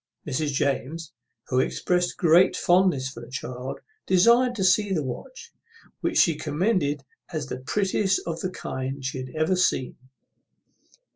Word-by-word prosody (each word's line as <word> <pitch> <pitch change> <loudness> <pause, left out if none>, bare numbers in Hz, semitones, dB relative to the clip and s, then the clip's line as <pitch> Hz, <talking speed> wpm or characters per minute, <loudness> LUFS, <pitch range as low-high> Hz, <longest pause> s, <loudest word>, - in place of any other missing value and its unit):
Mrs. 145 +1 -1
James, 140 +3 -2 0.4
who 125 - +2
exprest 180 +6 0
great 175 0 +5
fondness 175 -7 +3
for 130 - -10
the 120 - -11
child, 125 0 -6 0.3
desired 235 +7 +4
to 195 - -1
see 195 +2 +3
the 160 -6 0
watch, 260 - -8 0.5
which - - -1
she 170 - +5
commended 150 -2 0 0.3
as 155 -3 -3
the 130 - -6
prettiest 195 +6 0
of 165 -1 -3
the 185 - -2
kind 135 -6 -5
she 130 0 -3
had 130 0 -6
ever 155 +4 +1
seen. 180 -8 0
160 Hz, 145 wpm, -25 LUFS, 135-185 Hz, 0.5 s, great